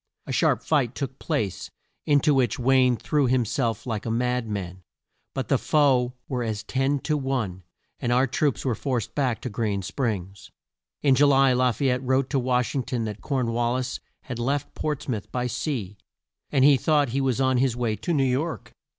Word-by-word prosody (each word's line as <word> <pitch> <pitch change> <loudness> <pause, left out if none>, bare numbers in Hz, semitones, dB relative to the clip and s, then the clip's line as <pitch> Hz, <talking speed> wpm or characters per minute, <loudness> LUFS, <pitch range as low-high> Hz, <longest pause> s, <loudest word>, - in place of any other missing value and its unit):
A - - -6
sharp - - +2
fight 135 -6 +1
took 135 -2 -5
place, 110 - -2 0.4
in 145 -1 +4
to 150 +1 +3
which 130 -5 +2
Wayne 125 -1 +3
threw 145 +1 +1
him 125 -1 +2
self 115 -1 -1
like 110 -4 -3
a - - -4
mad 125 +1 0
man, 95 -3 -5 0.5
but - - -2
the - - +2
foe 130 -5 +2
were 125 -2 -2
as 110 -3 -3
ten 135 +2 0
to 155 - 0
one 130 -10 -2 0.4
and 120 - -1
our 125 +2 +4
troops 140 +1 -1
were 130 - +1
forced 125 -1 -2
back 130 -5 0
to 125 - -4
Green 105 -3 -1
Springs. 100 -4 -3 0.5
In 140 -2 +5
Ju 145 +2 +5
ly 135 -2 +5
La 125 0 +3
fay 135 +4 0
ette 125 0 0
wrote 130 0 0
to 140 - +2
Wash 125 -1 0
ing 135 - 0
ton 120 -1 -3
that 105 -1 -5
Corn 130 -5 -1
wal 120 +1 0
lis 130 0 -3 0.2
had 120 -3 -6
left 140 +4 -1
Ports 150 -2 -3
mouth 110 -6 -4
by 125 -1 -1
sea, 115 - -3 0.5
and 135 -2 +4
he 145 -1 +7
thought 145 0 +2
he 135 +4 -1
was 130 -2 0
on 130 -1 +2
his 130 -2 +2
way 115 -3 0
to 175 - -3
New 145 -5 +2
York. 140 +6 -2
125 Hz, 205 wpm, -25 LUFS, 115-135 Hz, 0.5 s, he